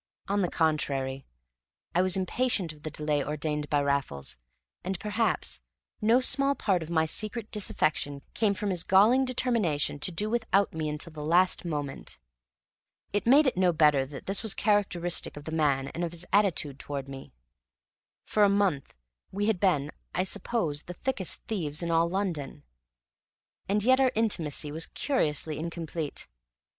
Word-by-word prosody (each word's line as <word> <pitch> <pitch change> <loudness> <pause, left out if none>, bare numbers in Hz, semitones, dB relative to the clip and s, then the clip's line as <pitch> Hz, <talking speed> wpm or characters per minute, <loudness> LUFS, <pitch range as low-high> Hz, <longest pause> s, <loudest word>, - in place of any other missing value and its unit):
On 200 +1 +1
the 180 - +1
contrary, 140 -4 -1 0.7
I 180 - +3
was 185 0 +2
impatient 190 -3 0
of 150 - -18
the 155 - -5
delay 150 -1 -1
ordained 150 0 -3
by 145 -1 +2
Raffles; 135 - -1 0.5
and, 190 0 -3
perhaps, 210 - -1 0.4
no 225 +4 +5
small 275 +2 +3
part 190 -8 +1
of 160 - -7
my 160 -2 +2
secret 215 +6 -3
disaffection 150 -8 -1
came 215 -3 +2
of 200 - -8
his 180 -2 0
galling 220 +8 +5
determination 225 - 0
to 165 - +1
do 205 +5 0
without 220 -4 +1
me 160 -1 -2
until 150 +2 -5
the 150 -1 -6
last 175 +4 +3
moment. 145 -4 -5 1.0
It 205 +1 -1
made 285 +5 +7
it 260 - +1
no 180 -1 +3
better 150 -4 +4
that 140 -1 -9
this 195 +1 0
was 220 -3 +2
characteristic 180 -7 0
of 145 - -8
the 160 - -6
man 140 -4 +1
and 170 - -4
of 170 -1 -3
his 170 +1 -5
attitude 175 -9 +2
towards 140 -2 -3
me. 135 0 -9 0.9
For 210 - +2
a 200 - +6
month 195 -9 0 0.4
we 205 +2 -1
had 215 -4 +1
been, 155 -7 +2 0.2
I 180 - +2
suppose, 190 -6 -1
the 180 - -9
thickest 240 -7 -3
thieves 165 -7 -2
in 170 - -1
all 165 +1 +3
London, 175 -7 -3 1.1
and 205 +1 +2
yet 260 +3 +5
our 260 -1 +4
intimacy 165 -9 -1
was 160 +2 -1
curiously 155 - -1
incomplete. 165 -2 -5
170 Hz, 165 wpm, -28 LUFS, 150-205 Hz, 1.1 s, made